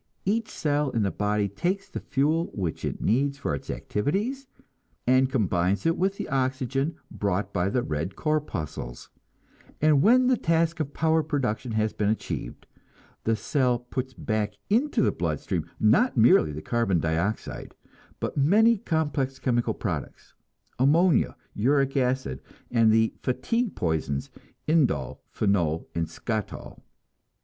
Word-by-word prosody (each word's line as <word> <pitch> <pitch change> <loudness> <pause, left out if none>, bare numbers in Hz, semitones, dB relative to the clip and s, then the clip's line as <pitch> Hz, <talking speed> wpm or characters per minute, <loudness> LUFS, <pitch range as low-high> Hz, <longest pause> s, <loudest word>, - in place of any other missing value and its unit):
Each 220 +3 0
cell 145 -1 0
in 115 -4 0
the 100 - 0
body 105 0 0
takes 180 - -2
the - - -6
fuel 155 +5 0
which 90 -6 -3
it - - -3
needs 140 +5 +1
for 140 - -2
its 70 - -6
activities, 210 - -2 0.6
and 130 +1 +4
combines 100 - +1
it 165 0 +3
with 195 +2 0
the - - -4
oxygen 135 +2 -1 0.2
brought 100 0 -2
by 90 0 +1
the 125 +2 0
red 80 +5 -3
corpuscles; 105 - -3 0.7
and 150 -2 +4
when 250 - +5
the 255 -1 +3
task 165 -1 +1
of 145 -2 -3
power 160 0 +3
production 130 -6 -2
has 110 0 0
been 105 -1 0
achieved, 110 - -4 0.6
the 115 - +2
cell 125 +1 +1
puts 130 +2 -5
back 105 -2 -2 0.2
into 255 +8 +2
the - - +3
blood - - -2
stream, - - -3
not 250 - +3
merely 110 -9 +5
the 75 +1 -7
carbon 115 -7 +1
dioxide, 85 +7 -2 0.4
but - - -3
many 210 +10 +4
complex 145 -6 -1
chemical 120 -2 0
products - - -5 0.5
ammonia, 155 +3 +4 0.2
uric 135 +4 +2
acid, 125 - 0 0.3
and 115 -2 +4
the 110 0 +3
"fatigue 230 - -1
poisons," 80 -4 -2 0.4
indol, 135 - +1
phenol 85 -6 0
and 85 -1 -1
skatol. 110 +2 -5
130 Hz, 140 wpm, -26 LUFS, 105-155 Hz, 0.7 s, when